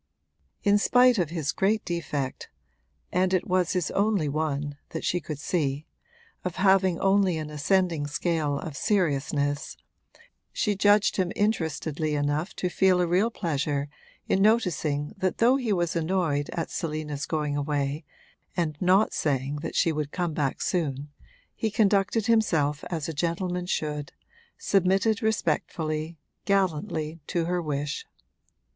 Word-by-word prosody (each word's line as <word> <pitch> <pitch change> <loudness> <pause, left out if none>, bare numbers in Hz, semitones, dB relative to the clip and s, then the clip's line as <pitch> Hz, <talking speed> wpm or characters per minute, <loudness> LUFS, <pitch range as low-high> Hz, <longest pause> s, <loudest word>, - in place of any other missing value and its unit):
In 205 0 +4
spite 245 +1 +5
of 170 -4 +1
his 160 -4 -2
great 210 +3 +1
defect 145 -6 -3 0.6
(and 185 +1 +2
it 185 - 0
was 180 -1 +1
his 180 -4 -1
only 200 -6 +1
one, 145 -1 -2
that 160 - -5
she 180 - +1
could 155 -3 -6
see) 145 -2 -1 0.6
of 180 -2 -3
having 190 -2 +3
only 195 -3 +3
an 155 -1 -5
ascending 165 0 +1
scale 150 -1 -1
of 155 0 -6
seriousness, 145 -6 0 0.7
she 210 -3 0
judged 205 +1 +4
him 185 -2 +1
interestedly 160 -7 -1
enough 145 +5 -1
to 180 - -1
feel 185 0 +3
a 180 - +3
real 185 +6 +2
pleasure 145 -8 -2 0.4
in 190 - +2
noticing 175 -9 +1
that 185 -1 0
though 240 +3 +5
he 245 -5 -2
was 175 -3 0
annoyed 160 -4 0
at 165 - -3
Selina's 155 -2 -3
going 150 -2 -1
away 145 +1 -1 0.5
and 155 -4 -1
not 190 +4 +4
saying 140 -1 -1
that 150 - -5
she 165 - +3
would 150 -2 -3
come 175 -3 -2
back 145 -3 -1
soon, 145 -5 -2 0.4
he 220 - -1
conducted 205 0 +2
himself 160 -11 +2
as 165 -4 -3
a 165 - -3
gentleman 175 +3 -2
should, 150 -4 -2 0.4
submitted 195 +3 +2
respectfully, 160 -7 -1 0.3
gallantly, 165 -4 0
to 170 -2 0
her 175 +1 0
wish. 145 -2 -3
165 Hz, 140 wpm, -26 LUFS, 150-190 Hz, 0.7 s, spite